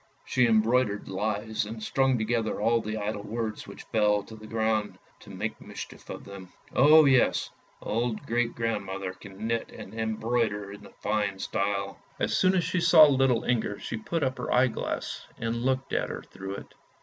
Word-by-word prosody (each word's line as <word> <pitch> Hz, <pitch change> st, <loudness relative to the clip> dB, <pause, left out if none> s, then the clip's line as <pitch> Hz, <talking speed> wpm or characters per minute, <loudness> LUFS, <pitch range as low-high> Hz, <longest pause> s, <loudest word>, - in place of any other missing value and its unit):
She 125 Hz, -2 st, +3 dB
embroidered 110 Hz, -1 st, +2 dB
lies, 105 Hz, +3 st, -1 dB
and 110 Hz, +1 st, -7 dB
strung 135 Hz, +2 st, +2 dB
together 110 Hz, 0 st, -1 dB
all 115 Hz, +2 st, +3 dB
the 110 Hz, 0 st, -4 dB
idle 105 Hz, 0 st, -3 dB
words 110 Hz, +1 st, -4 dB
which -, -, -10 dB
fell 105 Hz, -2 st, +2 dB
to 110 Hz, -, -11 dB
the 110 Hz, 0 st, -11 dB
ground, 110 Hz, -1 st, 0 dB, 0.2 s
to -, -, -15 dB
make -, -, -4 dB
mischief -, -, -9 dB
of -, -, -6 dB
them. 100 Hz, -2 st, -10 dB, 0.2 s
O 150 Hz, +4 st, +7 dB
yes, 130 Hz, -3 st, +3 dB, 0.3 s
old 115 Hz, 0 st, -1 dB
great 120 Hz, 0 st, 0 dB
grand 115 Hz, -3 st, -1 dB
mother 95 Hz, -1 st, -5 dB
can 100 Hz, +2 st, -9 dB
knit 115 Hz, 0 st, -1 dB
and 95 Hz, -, -10 dB
embroider 110 Hz, -2 st, -1 dB
in 100 Hz, -, -11 dB, 0.2 s
fine 105 Hz, -2 st, 0 dB
style. 100 Hz, 0 st, -2 dB, 0.2 s
As -, -, +1 dB
soon 185 Hz, 0 st, +4 dB
as 180 Hz, -, +2 dB
she 180 Hz, -, 0 dB
saw 170 Hz, -2 st, +8 dB
little 135 Hz, -4 st, +3 dB
Inger, 110 Hz, -4 st, 0 dB
she -, -, -5 dB
put 145 Hz, +9 st, -2 dB
up 130 Hz, -1 st, -1 dB
her 125 Hz, -, -3 dB
eye 125 Hz, +1 st, +4 dB
glass -, -, -4 dB
and 115 Hz, 0 st, -2 dB
looked 130 Hz, +1 st, -1 dB
at -, -, 0 dB
her -, -, -6 dB
through 95 Hz, 0 st, -7 dB
it. -, -, -10 dB
110 Hz, 185 wpm, -28 LUFS, 105-125 Hz, 0.3 s, saw